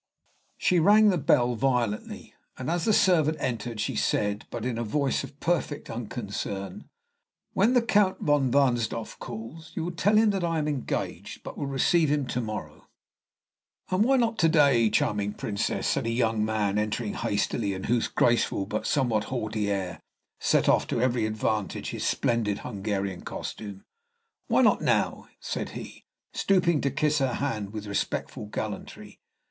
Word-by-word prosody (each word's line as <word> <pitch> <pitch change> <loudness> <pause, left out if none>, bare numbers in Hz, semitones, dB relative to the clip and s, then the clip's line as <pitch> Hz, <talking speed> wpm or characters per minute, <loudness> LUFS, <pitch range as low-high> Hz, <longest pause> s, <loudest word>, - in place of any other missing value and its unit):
She 180 - +3
rang 210 +5 +6
the 185 - +2
bell 125 -3 +3
violently, 120 -3 -1 0.2
and 130 +5 -3
as 170 -1 0
the 220 - +3
servant 160 -6 +3
entered 115 -2 -3
she 105 - -1
said, 105 0 0
but 120 -1 -5
in 120 -2 -2
a - - -1
voice 140 +5 0
of 140 - -11
perfect 165 -3 -1
unconcern, 100 -4 -5 0.6
"When 215 +6 +3
the 245 - +4
Count 205 -4 +2
von 145 -3 +2
Wahnsdorf 120 -5 +1
calls, 155 +9 -8
you 165 - -2
will 175 - -2
tell 190 +5 +2
him 220 -1 +5
that 195 -3 -2
I 165 -1 0
am 150 -1 0
engaged, 145 -4 -4
but - - -7
will 140 - -3
receive 150 +4 +2
him 145 -2 +1
to 125 - -1
morrow 110 -2 -6 0.5
" - - -33
"And 185 +3 +3
why 265 +3 +4
not 230 -2 +1
to 165 - +5
day, 140 -8 +4
charming 105 -1 0
Princess?" 100 -1 -2
said - - 0
a - - 0
young 115 -2 +1
man, 105 -2 0
entering 105 +1 -2
hastily, 100 0 -1
and 95 - -6
whose 120 0 +1
graceful 120 -4 +1
but 110 +1 -3
somewhat 115 -6 +1
haughty 110 -5 -2
air 95 -4 -2 0.4
set - - +2
off - - +3
to - - -1
every 125 -2 +1
advantage 110 -1 -2
his - - -4
splendid 110 -4 0
Hungarian 100 -3 -3
costume. 100 -3 -7 0.6
"Why - - +4
not - - +4
now?" - - 0
said - - -4
he, - - -10 0.3
stooping 175 -5 +2
to 140 - +1
kiss 150 +2 +1
her 135 -2 +1
hand 110 -8 -2
with 105 -1 -6
respectful 105 +1 -3
gallantry. 105 -1 -6
120 Hz, 165 wpm, -27 LUFS, 105-155 Hz, 0.6 s, rang